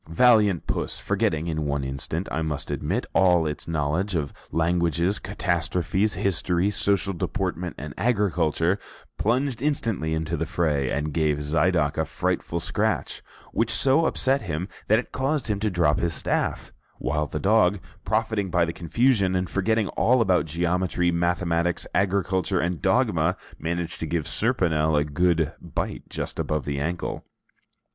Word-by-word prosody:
Valiant 105 -1 +4
Puss, - - -2
forgetting 80 +1 0
in 80 -3 -2
one 70 -1 -1
instant, 70 +6 -3
I 80 - -1
must 80 -3 -3
admit, - - -1
all 90 -3 +4
its 75 -1 -4
knowledge 80 +5 -1
of 75 -4 -2 0.2
languages, 85 +2 +1
catastrophes, 90 +1 -1
history, 95 0 +1
social 100 0 +1
deportment, 90 -1 -3
and 75 +1 -7
agriculture, 95 -5 +1 0.4
plunged 125 +2 0
instantly 115 - 0
into 80 +1 -2
the 80 0 -2
fray, 75 -5 0
and 75 +1 -2
gave 75 -2 +1
Zidoc 75 0 +1
a 80 - +1
frightful 85 +3 -2
scratch, 80 - -1 0.3
which 115 0 0
so 135 +7 +3
upset 135 +1 +1
him 85 -2 -3 0.2
that 110 - +5
it 125 - -4
caused 135 -1 -1
him 105 -1 0
to 110 +1 0
drop 85 -5 +2
his 85 -2 0
staff, - - -1 0.2
while 75 +2 -1
the 75 - -4
dog 100 -1 +3 0.2
profiting 110 -3 0
by 85 -1 +3
the 85 - -4
confusion, 100 +2 +2
and 90 0 0
forgetting 110 +2 +1
all 125 +2 +3
about 95 -6 +3
geometry, 85 +2 0
mathematics, 85 0 0
agriculture, 95 -1 +1
and 85 -4 -1
dogma, - - +2 0.2
managed 85 +1 -3
to 80 - -3
give 80 -1 -1
Serponel 80 -10 +1
a 75 - +3
good 80 +1 +1
bite 85 - -4
just - - -5
above 75 -3 -1
the 70 -1 -2
ankle. 85 +4 -3
85 Hz, 150 wpm, -25 LUFS, 80-100 Hz, 0.4 s, that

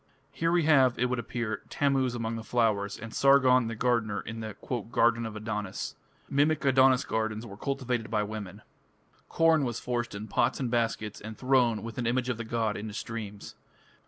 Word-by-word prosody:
Here 165 +3 0
we 175 -1 +3
have, 135 -5 +4
it 125 +1 0
would 125 - 0
appear, 115 -1 -3
Tammuz 135 -3 +1
among 115 -1 -3
the 115 - -5
flowers, 105 -5 0
and 115 +1 -9
Sargon, 130 -3 +5
the 115 - -4
gardener, 110 -3 0
in 115 0 -7
the 110 -2 -6 0.4
"Garden 115 -1 +3
of 110 - -8
Adonis". 105 -3 -4 0.3
Mimic 145 +2 +1
Adonis 130 -1 +5
gardens 110 0 -2
were 100 -4 -9
cultivated 125 -2 -2
by 105 -1 +1
women. 105 -1 -7 0.7
Corn, 165 -1 +4
&c., - - 0
was 120 -2 -3
forced 120 -3 -3
in 105 +2 -6
pots 120 +4 +1
and 125 -4 -2
baskets, 115 -3 -1
and 110 +1 -8
thrown, 125 -5 +2
with 115 +2 -6
an 120 - -1
image 125 +1 0
of 125 - -1
the 115 - -4
god, 110 -1 -1
into 105 0 -6
streams. 110 -4 -6
115 Hz, 190 wpm, -29 LUFS, 110-130 Hz, 0.7 s, Sargon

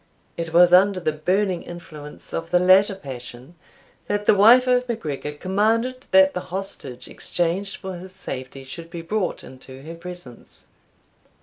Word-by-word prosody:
It 165 -1 -4
was 175 +1 +6
under 190 +1 +5
the 165 -3 0
burning 185 +4 0
influence 155 -4 -11
of 165 0 -4
the 180 - +4
latter 190 +3 +5
passion 130 -3 -9 0.5
that 205 0 -1
the - - +6
wife 230 +6 +7
of 250 0 +1
MacGregor 150 - -4
commanded 225 - 0
that 190 0 +5
the - - -2
hostage 180 -9 -5
exchanged 180 +3 -2
for 190 -1 -7
his 185 +2 -10
safety 135 -7 -7
should 165 +5 -9
be 170 -1 -7
brought 200 +2 -2
into 130 +1 -11
her 160 +2 -8
presence. 175 -7 -11
180 Hz, 150 wpm, -23 LUFS, 155-195 Hz, 0.5 s, wife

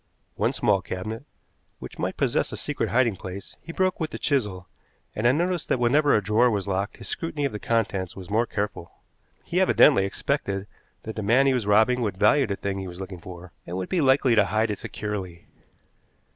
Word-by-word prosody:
One - - 0
small 100 -3 +1
cabinet, 110 +8 -6 0.5
which - - -10
might - - -2
possess - - 0
a - - -5
secret - - -2
hiding 115 -3 +2
place, 95 +2 -8
he 165 - -8
broke 185 +2 0
with 160 -2 -2
the - - -6
chisel, 105 - -1 0.5
and 110 +3 +1
I - - +6
noticed 175 +4 -1
that - - +2
whenever 140 +5 +3
a 105 - +1
drawer 110 +5 +3
was 100 -3 -2
locked 100 +1 -2
his - - -9
scrutiny 150 -3 -3
of 140 - -1
the 105 - -5
contents 100 -6 -1
was 95 -2 -9
more 115 +3 +1
careful. 100 -5 -4 0.5
He 180 +2 0
evidently 145 - +5
expected 100 -2 -2 0.4
that 110 - -6
the 110 - -3
man 120 +7 +4
he 135 - +4
was 120 -5 -1
robbing 110 +4 +4
would 105 -5 -2
value 125 +7 +4
the 100 - -2
thing 100 0 -3
he 95 - -5
was 90 0 -9
looking 95 -1 -7
for, 90 0 -11
and 90 +1 -4
would 95 - -4
be 180 - +1
likely 135 -2 +4
to 105 -3 +5
hide 110 +2 0
it 105 - -4
securely. 95 -5 -5
105 Hz, 210 wpm, -25 LUFS, 95-130 Hz, 0.5 s, I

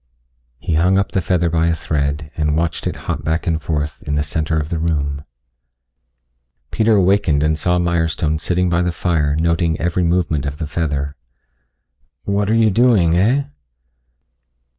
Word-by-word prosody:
He 80 - -3
hung 90 +5 +3
up 100 - 0
the 95 - 0
feather 90 -1 +1
by 80 0 +1
a 85 - +1
thread 75 -1 -2
and 75 -1 0
watched 85 0 -1
it - - -3
hop - - -3
back 80 +2 -1
and 80 -2 0
forth 75 -2 -3
in 75 - -3
the 75 - +1
center 80 +2 -2
of 75 -1 -2
the 85 - -2
room. 75 -3 -2 1.5
Peter 110 0 +2
awakened 95 -6 +2
and 80 0 +2
saw 90 +3 0
Mirestone 80 -3 0
sitting 90 +3 0
by 85 0 +1
the 90 0 0
fire 80 -4 0
noting 85 -1 +1
every 85 +2 0
movement 85 -4 0
of 70 +1 -5
the 80 - -4
feather. 75 -2 -2 1.1
"What 100 0 0
are 110 - +3
you 110 -2 +4
doing, 105 -7 +3
heh?" 115 +11 +2
85 Hz, 165 wpm, -19 LUFS, 75-90 Hz, 1.5 s, you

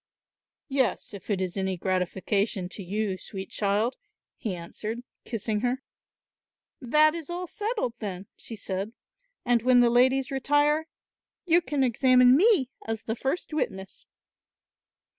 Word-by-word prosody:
"Yes, 265 -6 0
if 200 0 -10
it 200 -3 +1
is 185 -2 -2
any 190 -1 -1
gratification 185 +2 -1
to 200 - -7
you, 195 0 -2
sweet 190 0 -7
child," 210 +4 0 0.4
he 215 -7 -4
answered, 215 +7 -6 0.2
kissing 220 -2 -2
her. 250 +3 -1 1.0
"That 305 +5 +4
is 335 -2 -6
all 355 +1 -3
settled 420 - -2
then," 195 -2 -5
she 230 - -8
said, 195 +1 -4 0.5
"and 240 -1 +3
when 250 +1 +5
the 240 -1 +4
ladies 260 +3 +3
retire, 290 +3 +2 0.6
you 345 0 +5
can 290 -5 0
examine 250 0 +5
me 335 - +4
as 225 0 -4
the 225 - -2
first 270 +7 -3
witness." 190 -10 -4
235 Hz, 135 wpm, -27 LUFS, 200-270 Hz, 1.0 s, when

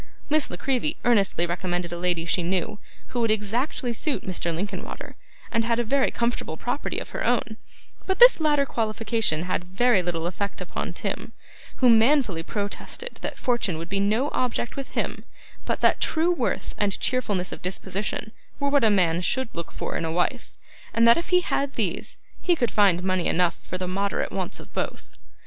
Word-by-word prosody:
Miss 310 -2 +3
La 175 - -6
Creevy 275 - 0
earnestly 200 -7 +3
recommended 175 0 -2
a - - -3
lady 175 -2 0
she 175 - +1
knew, 180 +3 -1 0.3
who 245 - -3
would 230 - +2
exactly 235 +4 0
suit 285 +4 -1
Mr. 175 -2 -2
Linkinwater, 190 +3 -5 0.4
and 230 -1 +2
had 230 0 +1
a 240 - +2
very 265 +4 +2
comfortable 235 -9 -2
property 245 - -3
of - - -6
her - - -3
own; 235 -2 +1 0.5
but 380 -1 +1
this - - +8
latter 295 -3 +3
qualification 220 - 0
had 180 -1 -1
very 195 +4 +3
little 170 -2 -2
effect 200 +3 -3
upon - - -4
Tim, - - -4 0.4
who 255 - +3
manfully 230 - +4
protested 205 - -5
that - - -4
fortune 235 -9 0
would 165 +1 -6
be 195 - 0
no 215 +8 +1
object 245 -1 -1
with 275 -1 -5
him, - - -1 0.4
but - - -1
that - - +4
true 325 +2 +2
worth 350 - -1
and 200 -2 +1
cheerfulness 205 -8 0
of - - -7
disposition 190 +3 -3 0.3
were 280 -1 +1
what 280 -2 +3
a 220 - +6
man 180 -4 +3
should 260 +7 0
look 170 - -5
for - - -4
in - - -1
a 160 - -1
wife, 175 +2 -1 0.5
and 230 +1 +5
that 235 - +8
if 340 - -3
he 360 0 +5
had 280 -5 -1
these, - - -2 0.2
he 355 - +3
could 240 -7 0
find 190 -4 +4
money 185 -2 +1
enough 175 0 +2
for 185 - -5
the 185 0 -3
moderate 200 +2 -1
wants - - -2
of - - -13
both. - - -4
215 Hz, 190 wpm, -25 LUFS, 180-255 Hz, 0.5 s, this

